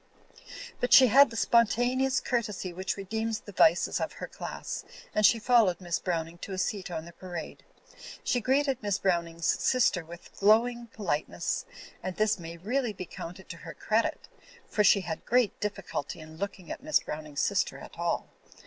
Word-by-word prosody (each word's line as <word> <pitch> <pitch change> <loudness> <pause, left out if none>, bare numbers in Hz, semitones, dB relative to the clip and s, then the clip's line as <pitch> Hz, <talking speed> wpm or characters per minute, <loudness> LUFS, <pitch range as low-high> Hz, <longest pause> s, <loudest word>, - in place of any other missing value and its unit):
But 245 - +1
she 255 -2 +9
had 275 +5 +7
the 230 - -9
spontane 240 +3 +3
ous 265 0 +2
courtesy 210 -7 -2
which 185 +3 -3
redeems 220 +3 -3
the 205 - -11
vices 175 -2 +4
of - - -2
her - - -6
class, - - -6 0.3
and 215 - +1
she 230 - +7
followed 225 -5 +3
Miss 175 -2 -2
Browning 170 -1 -3
to 195 - -6
a - - -4
seat 185 0 -2
on 160 -2 -5
the 170 - -12
parade. 175 -1 -7 0.6
She 245 -1 +1
greeted 270 +2 +1
Miss 205 -2 0
Browning's 170 -4 -1
sister 240 -8 +2
with 170 +1 -13
glowing* 235 +4 +3
politeness; 200 - -2 0.3
and 185 -1 -4
this 215 -2 +1
may 170 0 -8
really 230 +6 -1
be 185 -2 -6
counted 180 +2 -9
to 170 - -7
her - - -10
cred 220 +1 +1
it; - - -5 0.4
for 210 - +1
she 200 0 +5
had 165 -3 -5
great 245 -3 +2
difficulty 195 -8 -4
in 160 0 -11
looking 195 -2 -5
at - - -6
Miss 310 +2 +3
Browning's 150 -2 -5
sister - - 0
at - - -12
all. - - -1
200 Hz, 180 wpm, -29 LUFS, 175-235 Hz, 0.6 s, she